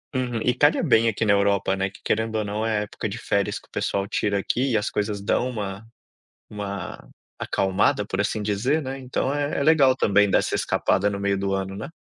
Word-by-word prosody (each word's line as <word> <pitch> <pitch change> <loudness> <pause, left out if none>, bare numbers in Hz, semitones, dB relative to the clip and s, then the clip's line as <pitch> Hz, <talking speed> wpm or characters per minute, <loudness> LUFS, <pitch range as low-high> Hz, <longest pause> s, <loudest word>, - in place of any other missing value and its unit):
Uhum 120 -3 -1
e 125 - +2
calha 145 +6 +3
bem 115 -7 +4
aqui 110 +1 -1
na 100 - +4
Europa, 100 -1 +2
né, 95 0 -1
que - - -16
querendo 110 +1 0
ou 110 -1 0
não, 105 +2 -3
é 110 -1 0
a - - 0
época 105 0 -5
de 105 - -5
férias 100 -3 -1
que - - -14
o - - -52
pessoal 100 0 -1
tira 100 -1 0
aqui 125 +6 0
e - - +4
as 105 - -2
coisas 105 -1 -2
dão 120 +5 0
uma 100 -3 -5 0.7
uma 100 -1 -6 0.3
acalmada, 100 +1 +1
por 95 -1 -2
assim 105 +1 -1
dizer, 110 +9 0
né, 135 -1 -5
então 130 +2 -2
é, 145 0 -1
é - - +1
legal 140 -5 +5
também 105 -2 +3
dessa - - +1
escapada 100 +2 +1
no 100 - -4
meio 100 0 0
do 95 0 -2
ano, 95 0 -3
né? 110 +7 -6
105 Hz, 225 wpm, -24 LUFS, 100-125 Hz, 0.7 s, legal